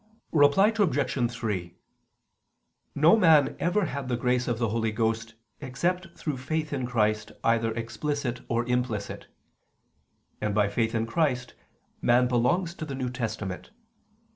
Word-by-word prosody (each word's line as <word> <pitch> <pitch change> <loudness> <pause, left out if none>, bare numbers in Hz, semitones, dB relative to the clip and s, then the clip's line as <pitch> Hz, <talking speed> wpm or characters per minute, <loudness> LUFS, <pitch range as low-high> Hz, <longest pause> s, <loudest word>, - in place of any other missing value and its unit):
Reply 160 +8 +5
Obj. 145 - +1
3: 100 -8 -4 1.2
No 155 +8 +6
man 160 -9 +5
ever 180 +4 +1
had 140 -3 -4
the 120 - 0
grace 125 0 0
of 120 -2 0
the 115 -1 0
Holy 110 0 0
Ghost 115 +1 -1 0.2
except 170 +7 -2
through 150 -4 -3
faith 155 +4 -3
in 130 -3 -2
Christ 110 -2 0
either 115 0 +2
explicit 125 +2 -3
or 120 0 0
implicit: 125 -4 -2 1.1
and 105 -1 -1
by 105 -1 +3
faith 115 +2 0
in 110 0 +1
Christ 125 -1 0 0.5
man 125 +1 +4
belongs 165 +9 +1
to 160 - -6
the 140 -3 -5
New 130 -2 -3
Testament. 110 -6 -4
125 Hz, 140 wpm, -27 LUFS, 115-145 Hz, 1.2 s, No